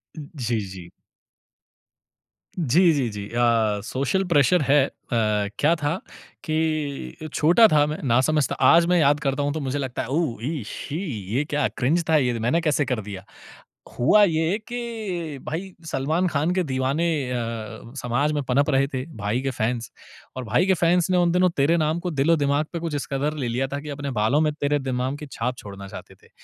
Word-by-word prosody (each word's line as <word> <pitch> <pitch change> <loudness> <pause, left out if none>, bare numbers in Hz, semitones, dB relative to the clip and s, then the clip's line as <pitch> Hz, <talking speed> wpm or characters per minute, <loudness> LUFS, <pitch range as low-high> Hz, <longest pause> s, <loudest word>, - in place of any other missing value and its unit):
जी, 140 - -3
जी। 95 -3 -8 1.7
जी, 170 +2 +4
जी, 135 -5 0
जी 105 -1 -6
अ, 115 -3 +2
social 135 - -1
pressure 160 +1 +4
है। 140 0 +4
अ, - - -8 0.7
क्या 160 +4 +4
था 145 +3 0 0.5
कि 155 - -2
छोटा 175 +9 +6
था 150 -1 +5
मैं, 150 +1 -4
ना 120 -2 +3
समझ 150 -1 +2
था। - - -1 0.2
आज 170 0 +6
मैं 175 0 +3
याद 145 -1 +4
करता 140 -1 -1
हूँ, 145 0 0
तो 160 - -3
मुझे 140 0 -2
लगता 130 -3 -3
है, - - -5
"ओह! 145 -2 -1
इ 150 -3 -3
शी! 150 - -5 0.4
ये 140 - +2
क्या 145 -2 +1
क्रिंज 145 +7 +1
था। 160 - +5
ये 125 -5 0
मैंने 120 +10 +1
कैसे 150 -2 +1
कर 125 -3 -2
दिया?" 100 -2 -8 0.7
हुआ 170 +12 +5
ये 165 0 +2
कि 215 - -4
भाई, 185 +5 -4
सलमान 155 +5 0
खान 155 0 0
के 185 - +2
दीवाने 130 +5 0 0.3
अ, - - -1 0.7
समाज 125 +5 0
में 145 - 0
पनप 135 +3 +1
रहे 135 -1 +3
थे, 130 -2 -4
भाई 105 +4 -1
के 135 - -1
फैन्स। 115 +1 -2 0.5
और 130 - -3
भाई 120 +9 +2
के 190 - +4
फैन्स 175 +1 +2
ने 185 - +3
उन 175 -1 +3
दिनों 180 +1 +3
तेरे 145 +5 +3
नाम 155 +1 0
को 180 - -1
दिल-ओ-दिमाग 145 0 +2
पे 170 - -2
कुछ 165 -2 -3
इस 145 - -2
कदर 140 +2 0
ले - - -1
लिया 125 +3 -1
था 140 - -2
कि 150 - -8
अपने 140 -1 -4
बालों 110 +4 +2
में 155 -1 +2
तेरे 145 -1 0
नाम 130 +1 -1
की 150 +1 -8
छाप 125 +2 -2
छोड़ना 100 -2 -9
चाहते - - -10
थे। - - -21
145 Hz, 195 wpm, -24 LUFS, 125-160 Hz, 1.7 s, छोटा